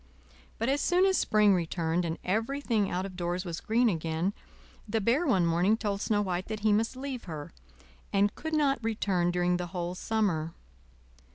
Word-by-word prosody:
But 230 - -1
as 275 +2 +1
soon 360 +2 +3
as 380 -1 +3
spring 210 -2 +4
returned, 170 -1 0
and 165 0 -2
everything 225 0 0
out 180 +2 -2
of 190 -2 -8
doors 180 +1 -2
was 170 -1 -4
green 235 +3 +2
again, 165 0 -1 0.6
the 225 +1 +1
Bear 245 - +2
one 190 -9 +3
morning 175 +6 +3
told 205 -3 -2
Snow 205 -1 +1
White 185 -1 -2
that 215 -1 -5
he 215 0 +3
must 225 +4 +1
leave 260 -2 -5
her, 155 -5 -7 0.6
and 200 +1 +2
could 315 0 -4
not 280 -5 +2
return 195 -6 0
during 175 0 +1
the 180 0 -4
whole 175 0 -2
summer. 180 -6 -1
200 Hz, 180 wpm, -29 LUFS, 175-225 Hz, 0.6 s, spring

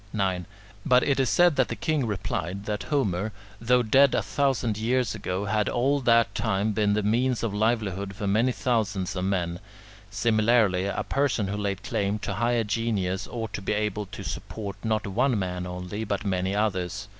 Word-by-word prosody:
9. 95 -4 0 0.4
But 125 0 +4
it 140 -1 +1
is 130 - +2
said 175 -4 +4
that 130 - +3
the - - -4
king 150 -6 0
replied, 95 -1 -3
that 105 -1 -2
Homer, 110 - 0 0.3
though 125 +2 +3
dead 135 +4 +5
a - - +1
thousand 135 -6 0
years 120 0 +1
ago, 95 +3 -3
had 105 0 +1
all 135 +4 +1
that 115 -5 +3
time 105 -1 0
been 105 0 +1
the 105 0 0
means 120 +4 +1
of 110 -3 -1
livelihood 105 -3 -1
for 105 +1 -4
many 110 +6 +2
thousands 105 -8 -1
of 90 0 -2
men; 90 -3 -1 0.5
similarly, 110 -4 +2
a 100 - -2
person 130 -8 0
who 100 - -2
laid 100 -2 -3
claim 100 +1 -1
to 105 - -4
higher 120 +3 +1
genius 105 -4 -1
ought 115 -2 -5
to - - -4
be 95 - -1
able 105 -1 -2
to 95 - -8
support 100 -3 -5
not 110 -1 0
one 120 +5 +1
man 90 -2 -3
only, 90 +4 -5
but 100 -1 -3
many 95 0 0
others. 105 -1 -1
105 Hz, 185 wpm, -26 LUFS, 95-120 Hz, 0.5 s, dead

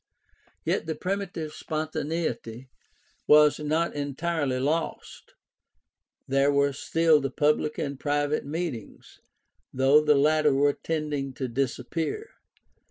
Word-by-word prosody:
Yet - - 0
the 160 - -2
primitive 180 -5 -4
spontaneity 155 -6 -4 0.6
was 150 0 +6
not 155 +3 0
entirely 145 -1 -2
lost. 155 +5 -3 0.9
There 135 +1 +3
were 140 0 +2
still 160 +2 +2
the 135 - -2
public 150 +1 +1
and 140 -2 -4
the - - -22
private 145 0 0
meetings, 150 - -6 0.5
though 135 +3 +4
the 150 -1 +4
latter 150 0 +3
were 145 +1 +3
tending 150 -4 -3
to 130 - -3
disappear. 135 - -3
150 Hz, 110 wpm, -26 LUFS, 135-160 Hz, 0.9 s, was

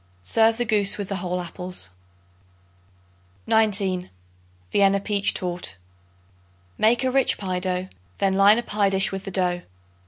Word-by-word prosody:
Serve 225 - +3
the 240 - -1
goose 210 -3 +3
with 205 -2 -5
the 195 - -2
whole 180 0 -3
apples. 180 - -6 1.5
19. 195 -4 +1 0.6
Vienna 200 0 +3
Peach 200 0 +1
Torte. 175 - -2 1.0
Make 235 +4 +2
a 260 - +1
rich 270 0 +2
pie 185 -2 -3
dough; 180 0 -2 0.3
then 195 -1 +1
line 200 +3 +5
a 240 - -1
pie 205 -3 0
dish 195 +1 +1
with 195 0 -6
the - - -5
dough. 180 -1 0
195 Hz, 145 wpm, -23 LUFS, 180-210 Hz, 1.5 s, line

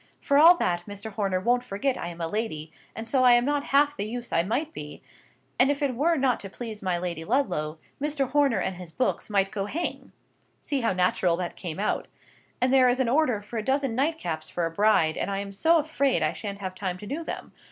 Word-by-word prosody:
For 280 -1 +3
all 340 +3 +8
that, 175 - -1
Mr. 205 +2 -7
Horner 195 -3 -1
won't 245 +5 +1
forget 250 +4 -1
I 170 - -5
am 175 0 -8
a 165 - -1
lady, 165 -6 -3 0.2
and 225 +1 -6
so 260 +1 +2
I 250 -1 +7
am 240 0 +4
not 290 0 0
half 290 +1 +3
the - - -3
use 240 +3 -5
I 165 - +4
might 255 - -2
be, 150 0 -9 0.6
and 255 - +5
if 285 +1 0
it 275 -2 +1
were 315 +8 +2
not 260 -3 +2
to 195 - -7
please 220 0 -7
my 185 -2 0
Lady 175 -2 -4
Ludlow, 165 - 0 0.2
Mr. 290 -2 0
Horner 285 -2 +2
and 190 - -2
his 180 -2 -9
books 255 +4 -1
might 195 -2 +1
go 200 -1 -3
hang 330 +10 -4 0.5
(see 280 -2 -2
how 230 - +1
natural 180 -1 +2
that 175 -1 -4
came 165 -4 -6
out!). 210 - -1 0.5
And 255 +1 +2
there 255 -2 +6
is 245 +2 +1
an 255 -3 +2
order 250 -6 +2
for 225 +2 -5
a - - -4
dozen 270 0 0
nightcaps 250 - -1
for 175 - -1
a 165 - -2
bride, 165 -4 +3
and - - -2
I 195 - -1
am 200 0 -4
so 325 +12 +3
afraid 280 - +1
I 155 - +1
shan't 200 -2 -6
have 185 -1 -4
time 185 -1 -4
to 210 - -10
do 290 +9 -4
them. - - -6
225 Hz, 235 wpm, -26 LUFS, 185-275 Hz, 0.6 s, all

